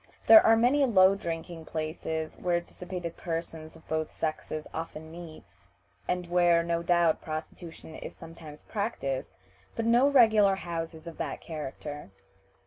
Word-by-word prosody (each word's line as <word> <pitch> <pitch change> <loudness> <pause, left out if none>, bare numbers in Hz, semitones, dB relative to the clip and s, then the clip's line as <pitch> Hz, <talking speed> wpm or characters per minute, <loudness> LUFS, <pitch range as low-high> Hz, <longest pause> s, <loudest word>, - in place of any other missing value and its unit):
There 330 - +10
are 225 - +6
many 255 +5 +3
low 195 -7 +6
drinking 165 -3 -5
places 160 0 -4
where 175 -1 0
dissipated 175 -1 -7
persons 165 -2 -5
of 160 - -18
both 155 0 -2
sexes 155 -1 -4
often 160 -1 -6
meet, 165 -2 -10 0.6
and 180 0 -1
where, 175 -1 +4
no 170 0 -1
doubt, 170 -2 +2
prostitution 160 +1 -7
is - - -8
sometimes 165 -2 -12
practiced, 200 - -3 0.5
but 230 - -2
no 240 +4 +5
regular 220 -7 +5
houses 165 -3 -5
of 170 -1 -9
that - - -3
character." 150 - -7
170 Hz, 135 wpm, -28 LUFS, 160-185 Hz, 0.6 s, There